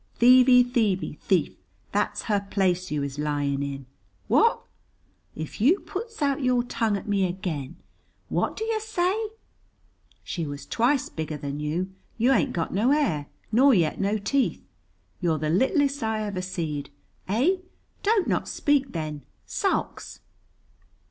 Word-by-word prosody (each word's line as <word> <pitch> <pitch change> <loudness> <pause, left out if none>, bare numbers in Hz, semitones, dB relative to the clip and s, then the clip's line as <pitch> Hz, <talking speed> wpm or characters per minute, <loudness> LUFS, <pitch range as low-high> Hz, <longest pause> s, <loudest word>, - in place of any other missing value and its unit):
"Thievey, 250 +1 +7
thievey, 225 -6 0
thief, - - +1 0.4
that's - - -1
her 200 -2 -1
place 185 -2 +1
you 150 -1 -1
is 140 0 -5
lying 145 -2 -1
in. 140 -1 -4 0.4
What? 460 0 +3 0.7
"If 160 +5 -6
you 320 - +5
puts 445 -3 -5
out 280 0 +1
your 250 -2 +2
tongue 225 -4 0
at 195 - -9
me 200 -2 +2
again! 175 -8 -4 0.5
What - - -1
do - - -2
yer 445 -1 0
say? 385 -4 0 1.1
"She 170 - -4
was 140 -1 -7
twice 250 - +1
bigger 155 -1 -4
than 140 0 -5
you. 165 +6 -2 0.3
You 240 +4 +3
ain't 250 - +2
got 165 - -2
no 215 +7 +2
hair, 170 - +1 0.2
nor 260 +3 +6
yet 165 -2 +1
no 200 +2 +1
teeth. 255 +6 0 0.5
You're 170 -3 +1
the 155 0 -1
littlest 275 - +2
I 220 -1 -1
ever 200 -3 -3
seed. 165 -6 -4 0.4
Eh? 260 - +2 0.4
Don't 415 -2 +2
not - - 0
speak 280 -2 +1
then, 155 -3 -4 0.2
sulks!" - - -2
205 Hz, 145 wpm, -26 LUFS, 155-265 Hz, 1.1 s, Thievey